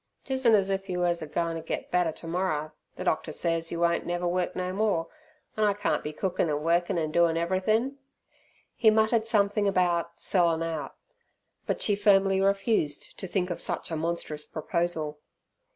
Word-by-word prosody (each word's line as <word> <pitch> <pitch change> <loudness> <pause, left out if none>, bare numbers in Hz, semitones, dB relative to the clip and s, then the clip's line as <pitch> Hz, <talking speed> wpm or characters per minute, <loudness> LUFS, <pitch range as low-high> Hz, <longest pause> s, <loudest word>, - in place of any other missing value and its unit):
"'Tisn't 260 -4 +3
as 195 -1 +1
if 195 0 -2
yer 180 - -2
was 175 -1 +1
agoin' 165 +2 -2
t' 165 - -4
get 160 - -5
better 180 -2 +2
t'morrer, 165 -2 -2 0.2
the - - -5
doctor 155 0 0
says 165 +1 0
yer 170 - -3
won't 170 0 +2
never 175 0 -2
work 180 0 -1
no 185 0 -2
more, 195 -5 +1 0.5
an' 215 - 0
I 205 -1 +4
can't 205 +1 -1
be 150 - -3
cookin' 180 +1 -1
an' 150 0 -1
workin' 175 +3 +1
an' 155 -2 -1
doin' 170 0 +3
everythin'!" 215 +10 0 0.8
He 225 - +5
muttered 220 +1 +2
something 205 -1 +2
about 175 -3 +1
"sellin' 170 -3 +2
out", 160 -4 -4 0.7
but - - -1
she 205 - +2
firmly 195 -2 +4
refused 195 -6 0
to 190 - -5
think 180 0 -1
of 175 - -4
such - - -3
a - - -1
monstrous 155 -2 -3
proposal. 160 -2 -2
175 Hz, 175 wpm, -27 LUFS, 165-200 Hz, 0.8 s, He